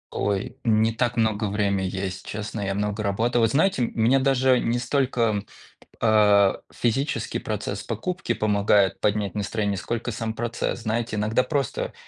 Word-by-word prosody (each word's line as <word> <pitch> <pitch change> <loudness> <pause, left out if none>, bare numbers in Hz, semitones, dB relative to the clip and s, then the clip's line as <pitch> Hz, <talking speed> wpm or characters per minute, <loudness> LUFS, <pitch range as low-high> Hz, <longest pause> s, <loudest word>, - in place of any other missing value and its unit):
Ой, 100 +4 -1
не 110 -1 +3
так 120 +1 -1
много 110 -2 +1
время 100 -2 0
есть, 95 0 -4
честно. 105 0 -5
Я 95 -1 -2
много 105 +1 -2
работал, 115 +4 +1
вы 115 - +5
знаете, 150 - +2
м, 120 - 0
мне 120 +4 +3
даже 130 -1 +3
не 120 +1 0
столько, 130 +1 -1
м, 105 -2 0 0.5
а, 105 -3 +4
физический 135 +5 -1
процесс - - -4
покупки 180 -10 -3
помогает 100 -2 +2
поднять 105 -2 0
настроение, 100 -1 -1
сколько 120 +5 -3
сам 110 0 -3
процесс. 120 +1 -3
Знаете, 110 0 -2
иногда 110 +4 +1
просто 140 -2 -2
110 Hz, 155 wpm, -24 LUFS, 105-120 Hz, 0.5 s, вы